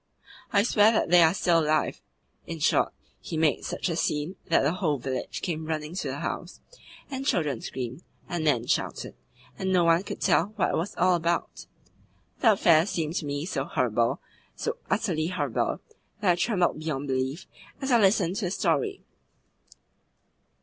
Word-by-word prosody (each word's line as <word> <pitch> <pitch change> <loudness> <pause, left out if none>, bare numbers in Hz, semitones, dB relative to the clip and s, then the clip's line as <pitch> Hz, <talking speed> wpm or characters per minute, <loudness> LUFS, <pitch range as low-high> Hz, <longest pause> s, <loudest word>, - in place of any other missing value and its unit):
I 200 -2 +4
swear 215 -1 +5
that 195 - 0
they 175 -1 +8
are 160 -1 +6
still 175 -2 +2
alive.' 155 -1 0 0.5
In - - -5
short, - - +2 0.3
he 160 - -5
made 155 -5 +2
such - - -3
a - - -1
scene 150 +5 -1
that 165 - +4
the 140 - +2
whole 170 -6 0
village 130 0 -4
came 160 -4 -3
running 155 0 -3
to 185 - -3
the - - -4
house, - - -5 0.5
and 265 0 -3
children 150 - 0
screamed, 130 +3 -5 0.3
and 175 -2 -3
men 125 -7 +2
shouted, - - -2 0.5
and 190 0 -1
no 180 -2 +4
one 165 +1 +4
could - - -7
tell 210 - +2
what 205 - +1
it - - 0
was 170 +5 -2
all 180 +1 +4
about. 170 0 -1 0.7
The 225 -4 +5
affair 170 -3 +4
seemed 165 -5 -2
to 150 - -3
me 145 +2 -3
so 155 -7 -2
horrible, 120 -3 0 0.4
so - - -3
utterly 155 +1 0
horrible, 180 +1 -1 0.4
that 200 -4 +3
I - - +3
trembled 180 -4 +1
beyond 145 -3 -3
belief 130 +5 -2 0.3
as 270 -1 -2
I 240 - +6
listened 195 -3 +3
to 215 - -1
the - - -1
story. 165 -7 0
165 Hz, 175 wpm, -27 LUFS, 150-185 Hz, 0.7 s, they